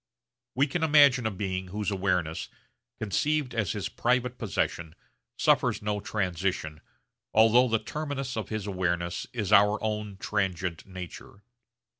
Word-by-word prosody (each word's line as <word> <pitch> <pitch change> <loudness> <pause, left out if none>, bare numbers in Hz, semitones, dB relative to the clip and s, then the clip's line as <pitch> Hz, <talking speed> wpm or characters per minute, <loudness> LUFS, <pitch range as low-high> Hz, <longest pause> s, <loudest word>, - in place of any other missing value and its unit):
We 135 +3 +4
can 155 +4 -3
imagine 145 -6 +5
a - - +1
being 95 -2 -3
whose 105 +2 -3
awareness, 90 -5 -1 0.5
conceived 135 +6 0
as 110 -5 0
his 105 - -3
private 125 +1 0
possession, 85 -6 -2 0.4
suffers - - +2
no 105 0 -1
transition, 90 -6 -2 0.5
although 115 +3 +6
the 115 -1 +2
terminus 135 +2 -4
of 110 - -4
his 110 -2 -3
awareness 85 -3 -2
is 110 -6 -1
our 105 +2 +6
own 105 -2 -3
transient 90 -3 -2
nature. 95 +2 -9
105 Hz, 130 wpm, -28 LUFS, 95-120 Hz, 0.5 s, although